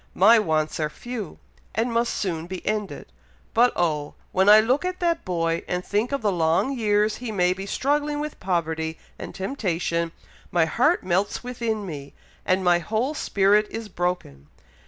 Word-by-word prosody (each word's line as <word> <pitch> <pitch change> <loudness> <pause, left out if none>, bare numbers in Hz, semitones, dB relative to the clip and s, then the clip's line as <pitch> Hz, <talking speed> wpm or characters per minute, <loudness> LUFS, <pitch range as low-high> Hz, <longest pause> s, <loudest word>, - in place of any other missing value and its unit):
My 220 +5 +7
wants 155 -6 0
are 155 -1 0
few, 230 +1 -7 0.4
and 230 +3 0
must 235 +1 +1
soon 170 -4 -2
be 185 0 -7
ended. 210 -8 -3 0.4
But 245 +2 +5
oh! 150 -4 -1 0.2
when 190 +2 +3
I 210 +1 +10
look 250 +8 +2
at 365 0 -3
that 340 -1 0
boy, 165 -2 -1
and 180 0 -2
think 210 +5 0
of 275 -4 -2
the 205 - +2
long 170 +10 +1
years 210 -2 +1
he 240 -2 -5
may 180 -3 +2
be 195 +1 -7
struggling 290 +5 0
with 300 0 -5
poverty 160 -3 -1 0.2
and - - -7
temptation, 175 -6 -1 0.4
my 170 -2 +3
heart 255 - +2
melts 190 +5 0
within 230 -4 -3
me, 145 -5 -8 0.3
and 185 +1 +2
my 175 -1 +4
whole 225 - -1
spirit 210 -6 +2
is 225 -1 -6
broken. 175 - -3
195 Hz, 170 wpm, -24 LUFS, 170-235 Hz, 0.4 s, I